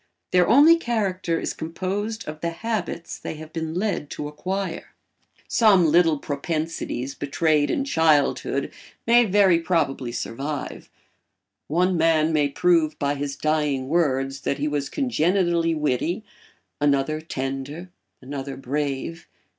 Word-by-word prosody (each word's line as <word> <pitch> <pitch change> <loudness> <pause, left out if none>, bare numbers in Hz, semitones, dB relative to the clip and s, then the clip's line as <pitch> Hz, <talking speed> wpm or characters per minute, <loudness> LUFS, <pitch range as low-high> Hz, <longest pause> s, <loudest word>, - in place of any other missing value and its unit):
Their 180 -1 +4
only 305 +6 +7
character 195 - -1
is - - -3
composed 195 +7 -4
of 155 +1 -7
the 170 - 0
habits 175 -2 -4
they - - -5
have 155 0 -11
been 160 -1 -4
led 190 -6 -1
to 145 - -5
acquire. 185 +4 -4 0.5
Some 205 -6 +5
little 165 0 +4
propensities 145 -3 -3
betrayed 145 +2 +1
in 275 - 0
childhood 145 - +2 0.3
may 240 +1 +5
very 195 -4 +4
probably 160 -8 0
survive; 135 +5 -5 0.8
one 180 +3 +1
man 160 -1 +3
may 145 -2 +2
prove 165 0 +2
by 140 0 0
his 140 -1 -4
dying 150 -4 0
words 135 -5 +1
that 140 - -1
he 145 - -1
was 145 -2 -2
congenitally 175 - +1
witty, 155 - -1 0.6
another 145 +1 +1
tender, 140 +4 -5 0.3
another 135 0 -6
brave. 140 +4 -3
160 Hz, 125 wpm, -24 LUFS, 145-180 Hz, 0.8 s, only